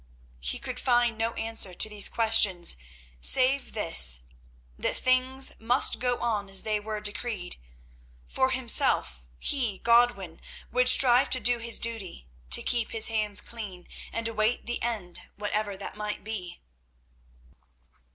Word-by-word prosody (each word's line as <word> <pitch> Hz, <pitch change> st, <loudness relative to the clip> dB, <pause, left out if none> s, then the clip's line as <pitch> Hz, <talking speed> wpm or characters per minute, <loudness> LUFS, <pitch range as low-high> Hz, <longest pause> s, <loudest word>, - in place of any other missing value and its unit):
He 60 Hz, +1 st, -1 dB
could 250 Hz, 0 st, -5 dB
find 240 Hz, -2 st, +1 dB
no 225 Hz, +1 st, -2 dB
answer 225 Hz, -5 st, -3 dB
to -, -, +1 dB
these 210 Hz, -2 st, -1 dB
questions, 215 Hz, -, +3 dB, 0.4 s
save 265 Hz, -, +3 dB
this—that -, -, 0 dB
things 255 Hz, +1 st, +2 dB
must 240 Hz, +4 st, +2 dB
go 245 Hz, -1 st, -1 dB
on 215 Hz, -4 st, -2 dB
as 195 Hz, -1 st, +2 dB
they 215 Hz, -1 st, -1 dB
were 215 Hz, 0 st, -5 dB
decreed. 205 Hz, -3 st, -5 dB, 0.7 s
For 260 Hz, -, 0 dB
himself, 225 Hz, -, +1 dB
he, 240 Hz, -, -2 dB
Godwin, 235 Hz, -8 st, +1 dB, 0.3 s
would 250 Hz, 0 st, +5 dB
strive 255 Hz, -1 st, +5 dB
to 255 Hz, -, +1 dB
do 245 Hz, -1 st, +2 dB
his 230 Hz, 0 st, +1 dB
duty, 220 Hz, -, -3 dB, 0.2 s
to 65 Hz, -, +5 dB
keep 235 Hz, -2 st, -1 dB
his 225 Hz, -1 st, +2 dB
hands 210 Hz, -2 st, -1 dB
clean, 200 Hz, -6 st, -9 dB, 0.2 s
and 230 Hz, 0 st, -3 dB
await 220 Hz, +1 st, -1 dB
the 240 Hz, 0 st, -4 dB
end, 210 Hz, -7 st, -4 dB
whatever 205 Hz, -1 st, -2 dB
that 195 Hz, -, -7 dB
might 210 Hz, 0 st, -5 dB
be. 195 Hz, -5 st, -6 dB
220 Hz, 135 wpm, -27 LUFS, 190-240 Hz, 0.7 s, would